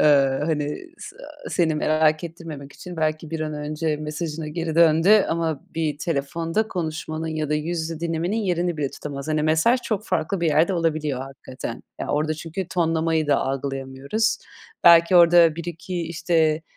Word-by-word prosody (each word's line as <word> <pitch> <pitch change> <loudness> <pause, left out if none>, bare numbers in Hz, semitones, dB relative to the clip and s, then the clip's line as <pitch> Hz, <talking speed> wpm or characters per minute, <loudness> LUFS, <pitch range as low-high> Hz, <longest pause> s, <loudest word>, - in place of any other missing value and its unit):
Iıı, 140 -1 +4
hani, 150 -2 -1 0.2
s - - -10 0.3
seni 165 -3 +1
merak 155 +1 +2
ettirmemek 160 -4 -8
için 180 -2 -10
belki 155 0 -1
bir 165 -1 -3
an 155 -1 -3
önce 150 +1 -2
mesajına 155 +1 -4
geri 165 0 -3
döndü 170 +5 +5
ama 165 -3 -1
bir 155 -3 -1
telefonda 165 +6 -1
konuşmanın 160 -2 -4
ya 155 -2 -2
da 150 - +1
yüz 165 +3 -2
yüze 160 0 -5
dinlemenin 170 +4 -1
yerini 180 -5 0
bile 145 -3 -1
tutamaz. 140 0 -7
Hani, 155 -1 +1
mesaj 160 +11 +3
çok 215 -3 -3
farklı 165 +4 -1
bir 170 - +1
yerde 160 +5 +3
olabiliyor 155 -5 -1
hakikaten. 135 -1 -8 0.2
Ya, - - -3
orada 155 +1 0
çünkü 165 +3 -5
tonlamayı 165 -2 +1
da 145 -1 +3
algılayamıyoruz. 135 - -2 0.5
Belki 170 +1 +7
orada 170 -2 +6
1-2, 175 +1 -5
işte, 160 -1 +1
160 Hz, 155 wpm, -23 LUFS, 150-170 Hz, 0.5 s, Belki